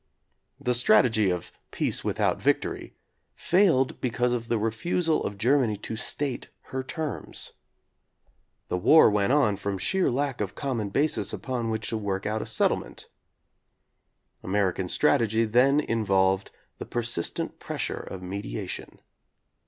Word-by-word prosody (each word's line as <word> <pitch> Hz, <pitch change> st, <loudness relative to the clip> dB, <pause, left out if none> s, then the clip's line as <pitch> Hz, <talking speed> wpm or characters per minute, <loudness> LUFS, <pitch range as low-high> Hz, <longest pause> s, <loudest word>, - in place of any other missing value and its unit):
The 125 Hz, -, 0 dB
strategy 110 Hz, -3 st, +4 dB
of 90 Hz, -2 st, -3 dB, 0.2 s
"peace -, -, -1 dB
without -, -, 0 dB
victory" -, -, -1 dB, 0.4 s
failed 170 Hz, -8 st, +2 dB
because 125 Hz, 0 st, 0 dB
of 115 Hz, -1 st, -3 dB
the 115 Hz, -, +2 dB
refusal 155 Hz, +10 st, 0 dB
of 100 Hz, -, -4 dB
Germany 120 Hz, -1 st, +2 dB
to 110 Hz, +2 st, -6 dB
state 130 Hz, +2 st, -2 dB, 0.2 s
her 130 Hz, -, -2 dB
terms. 155 Hz, +3 st, -5 dB, 1.1 s
The 90 Hz, -, -2 dB
war 155 Hz, -, +6 dB
went 105 Hz, +2 st, +1 dB
on 135 Hz, -9 st, +3 dB
from 100 Hz, -1 st, -3 dB
sheer 190 Hz, -, +1 dB
lack 135 Hz, -1 st, -1 dB
of 100 Hz, -, -1 dB
a -, -, -21 dB
common 120 Hz, -8 st, -3 dB
basis 145 Hz, +9 st, +1 dB
upon 125 Hz, -3 st, -3 dB
which 110 Hz, 0 st, -2 dB
to 115 Hz, -, -2 dB
work 100 Hz, -2 st, -3 dB
out 110 Hz, +1 st, -1 dB
a -, -, -6 dB
settle -, -, +2 dB
ment. -, -, -10 dB, 1.3 s
American 95 Hz, -2 st, 0 dB
strategy 115 Hz, +3 st, +2 dB
then 125 Hz, +6 st, +4 dB
involved 95 Hz, -7 st, +1 dB, 0.3 s
the -, -, -5 dB
per 120 Hz, -, -2 dB
sistent 110 Hz, -7 st, -2 dB
pressure -, -, -3 dB
of 95 Hz, -1 st, -8 dB
mediation. 90 Hz, -10 st, -6 dB
115 Hz, 140 wpm, -26 LUFS, 100-130 Hz, 1.3 s, war